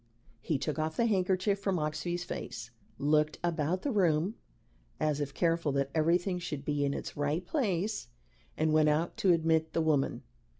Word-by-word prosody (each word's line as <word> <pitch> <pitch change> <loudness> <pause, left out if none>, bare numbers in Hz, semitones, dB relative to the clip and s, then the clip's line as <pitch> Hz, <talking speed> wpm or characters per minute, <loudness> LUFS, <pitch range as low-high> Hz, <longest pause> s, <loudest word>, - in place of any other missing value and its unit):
He 150 +2 0
took 150 +2 -3
off 155 0 -2
the 235 - +3
handkerchief 195 -1 +1
from 195 -2 0
Oxbye's 175 +3 -2
face, 115 -8 -6 0.3
looked 150 +1 +2
about 170 +1 0
the 285 - 0
room 180 -2 +2 0.7
as 150 -1 0
if 140 -1 -2
careful 165 0 +1
that 140 0 0
everything 175 +3 +2
should 150 -6 -5
be 145 -1 0
in 140 0 0
its - - -6
right 150 +5 -1
place, 210 - -1 0.5
and 155 0 +2
went 155 -1 +5
out 155 +3 0
to 190 - +4
admit 160 -1 +2
the 165 - +1
woman. 150 -4 +1
160 Hz, 170 wpm, -31 LUFS, 150-180 Hz, 0.7 s, went